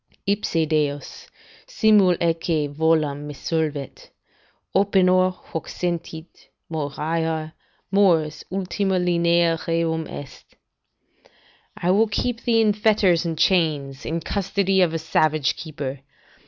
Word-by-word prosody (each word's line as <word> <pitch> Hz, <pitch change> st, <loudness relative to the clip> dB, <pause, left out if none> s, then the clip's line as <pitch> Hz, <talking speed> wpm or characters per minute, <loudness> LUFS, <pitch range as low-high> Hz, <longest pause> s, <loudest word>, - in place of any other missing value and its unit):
Ipse 200 Hz, -5 st, 0 dB
Deus, 150 Hz, -2 st, -2 dB, 0.4 s
simul 215 Hz, -, +4 dB
atque 165 Hz, -2 st, 0 dB
volam, 155 Hz, -2 st, +1 dB
me 145 Hz, -, -7 dB
solvet. 150 Hz, -3 st, -3 dB, 0.7 s
Opinor, 185 Hz, -2 st, +3 dB
Hoc 165 Hz, -2 st, -8 dB
sentit; 170 Hz, -2 st, -5 dB, 0.2 s
moriar; 160 Hz, +1 st, -2 dB, 0.4 s
mors 170 Hz, -6 st, +2 dB
ultima 190 Hz, 0 st, -1 dB
linea 170 Hz, -1 st, +2 dB
rerum 165 Hz, -1 st, 0 dB
est." 145 Hz, -, -10 dB, 1.2 s
["I 175 Hz, -, +1 dB
will 215 Hz, +4 st, +4 dB
keep 235 Hz, +2 st, -2 dB
thee 230 Hz, -2 st, +3 dB
in 215 Hz, -2 st, +3 dB
fetters 205 Hz, -5 st, +2 dB
and 165 Hz, -1 st, -3 dB
chains, 150 Hz, -7 st, +1 dB
in 165 Hz, +1 st, -3 dB
custody 195 Hz, +1 st, 0 dB
of 165 Hz, -3 st, +2 dB
a -, -, +1 dB
savage 155 Hz, -3 st, +1 dB
keeper. 140 Hz, -4 st, -6 dB
165 Hz, 110 wpm, -23 LUFS, 155-190 Hz, 1.2 s, simul